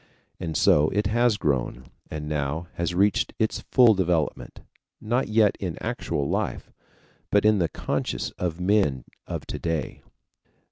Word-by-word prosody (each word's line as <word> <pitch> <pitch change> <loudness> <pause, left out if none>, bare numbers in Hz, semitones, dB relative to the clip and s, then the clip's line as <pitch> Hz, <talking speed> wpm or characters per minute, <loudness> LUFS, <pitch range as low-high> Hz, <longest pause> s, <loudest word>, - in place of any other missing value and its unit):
And 80 -4 -3
so 75 +1 +4
it 105 +2 0
has 115 +1 +2
grown, 65 -6 -1 0.2
and 75 -1 -5
now 75 +2 -2
has 85 0 -2
reached 100 +3 +2
its 110 - 0
full 120 -4 +5
development, 90 -5 -1 0.4
not 120 +4 0
yet 110 -2 +3
in 90 -4 -4
actual 70 -1 -2
life, - - -2 0.6
but 100 0 +3
in 105 -1 +5
the 85 - +1
conscience - - -3
of 90 -1 -4
men 90 - +2 0.2
of - - -5
to - - -5
day. 80 -4 -3
90 Hz, 145 wpm, -25 LUFS, 75-105 Hz, 0.6 s, full